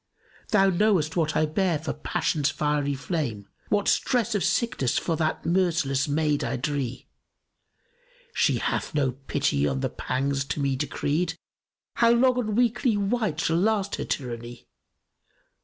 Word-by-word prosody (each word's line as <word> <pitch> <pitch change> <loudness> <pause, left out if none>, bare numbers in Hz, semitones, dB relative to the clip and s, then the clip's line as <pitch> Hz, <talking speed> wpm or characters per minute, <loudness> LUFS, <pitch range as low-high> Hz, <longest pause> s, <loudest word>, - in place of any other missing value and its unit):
Thou 195 -2 +4
knowest 180 -5 +2
what 155 -3 0
I 155 - +3
bear 170 +2 +1
for 155 +2 -4
passion's 145 -2 0
fiery 145 -1 0
flame; 130 - -3
* - - -33
What 205 -1 +1
stress 235 -2 +1
of 205 - 0
sickness 140 - 0
for 165 - 0
that 155 -1 -1
merciless 165 -6 +1
maid 150 0 +1
I - - -1
dree. 135 -1 -3 1.3
She - - +2
hath - - -2
no 140 -3 +2
pity 120 - -1
on 65 -2 -1
the - - 0
pangs 135 +1 -1
to 145 - -3
me 140 -1 +1
decreed; 155 +4 -1 0.3
* - - -68
How 235 - +5
long 245 +2 +4
on 215 -4 -1
weakly 235 -1 +2
wight 205 -5 -1
shall 165 - +1
last 200 +1 +1
her - - -3
tyranny? 120 -2 -5
155 Hz, 155 wpm, -26 LUFS, 140-200 Hz, 1.3 s, How